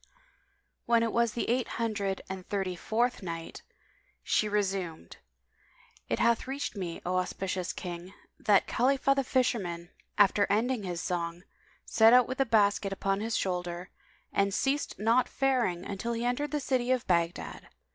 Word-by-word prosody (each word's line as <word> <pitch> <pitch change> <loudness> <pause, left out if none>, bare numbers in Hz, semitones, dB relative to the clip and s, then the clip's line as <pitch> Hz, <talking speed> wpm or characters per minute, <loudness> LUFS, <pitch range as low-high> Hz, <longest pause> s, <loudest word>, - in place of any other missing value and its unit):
When 235 -1 +4
it 230 - 0
was 235 -2 +2
the 235 - -2
Eight 245 +1 +1
Hundred 205 -4 -1
and 190 -1 -6
Thirty 190 -3 -1
fourth 235 +7 0
Night, 165 -3 -6 0.6
She 215 - +1
resumed, 195 -5 -2 0.9
It - - +1
hath 235 +1 +2
reached 275 -2 -3
me, 180 -4 -5
O 180 +1 0
auspicious 185 0 -2
King, 175 0 -7 0.3
that 205 -2 +4
Khalifah 275 +2 +2
the 275 0 0
fisherman, 195 -10 -1 0.3
after 205 0 +4
ending 230 +3 +1
his 175 -3 -4
song, 170 0 -3 0.4
set 225 +1 +5
out 250 -1 +6
with 260 +1 -5
the 270 - +3
basket 205 -3 +3
upon 195 0 -1
his 225 +2 -1
shoulder 180 -1 -3 0.4
and 200 0 +1
ceased 275 +5 0
not 230 +4 +2
faring 245 -10 +1 0.2
till 235 +2 -2
he 230 +1 -2
entered 250 +5 0
the 300 +1 -1
city 255 -3 0
of 255 -2 +1
Baghdad. 170 -1 -1
210 Hz, 155 wpm, -29 LUFS, 185-245 Hz, 0.9 s, out